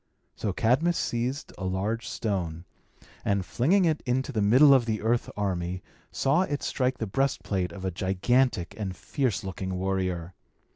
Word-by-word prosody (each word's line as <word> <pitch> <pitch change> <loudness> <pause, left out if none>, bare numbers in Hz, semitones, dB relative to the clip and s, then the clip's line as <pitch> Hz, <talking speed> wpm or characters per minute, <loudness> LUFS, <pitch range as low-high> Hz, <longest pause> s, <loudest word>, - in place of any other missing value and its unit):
So 105 - -2
Cadmus 130 - +2
seized 125 +4 -2
a - - -5
large 100 +5 -2
stone, 90 -6 -3 0.6
and, 100 -2 0
flinging 180 - +2
it 160 -2 +1
into 130 +2 -1
the 110 -5 0
middle 130 +8 +7
of 125 -3 +4
the 110 -1 0
earth 115 +2 +1
army, 90 -2 -2 0.3
saw 140 +6 +2
it 145 -6 -2
strike 130 -1 0
the 110 - -2
breast 135 +7 0
plate 90 -3 -1
of 95 +2 -7
a 95 - 0
gigantic 95 +3 +1
and 95 -3 -3
fierce 125 - -1
looking 95 -1 -4
warrior. 90 -2 -2
110 Hz, 160 wpm, -27 LUFS, 95-130 Hz, 0.6 s, middle